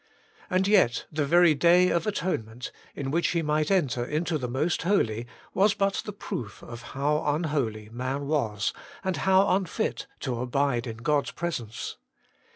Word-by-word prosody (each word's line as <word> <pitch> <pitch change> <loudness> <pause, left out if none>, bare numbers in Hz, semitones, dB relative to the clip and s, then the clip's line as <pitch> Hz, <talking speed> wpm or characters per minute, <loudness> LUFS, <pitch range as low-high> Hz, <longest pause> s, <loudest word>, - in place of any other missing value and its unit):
And 185 0 +2
yet 185 - +3
the 150 -2 -1
very 175 +1 +6
Day 175 +4 +5
of 170 +4 0
Atonement, 125 - -2 0.2
in 135 -1 -3
which 170 +3 +2
he 170 -1 0
might 150 0 +1
enter 145 -11 +2
into 155 +4 -1
the 125 - -2
Most 135 +8 0
Holy, 120 - +1 0.3
was 200 +2 +3
but 195 0 +1
the 210 - -4
proof 120 - -6
of 120 0 -8 0.2
how 150 +2 +1
unholy 145 -9 -1
man 130 +4 -3
was, 115 -9 0 0.3
and 190 -2 -1
how 190 +1 +4
unfit 190 -3 -2
to 125 -3 -2
abide 125 -1 0
in 110 -1 -5
God's 145 +5 +1
Presence. 120 -11 -4
150 Hz, 160 wpm, -27 LUFS, 125-175 Hz, 0.3 s, very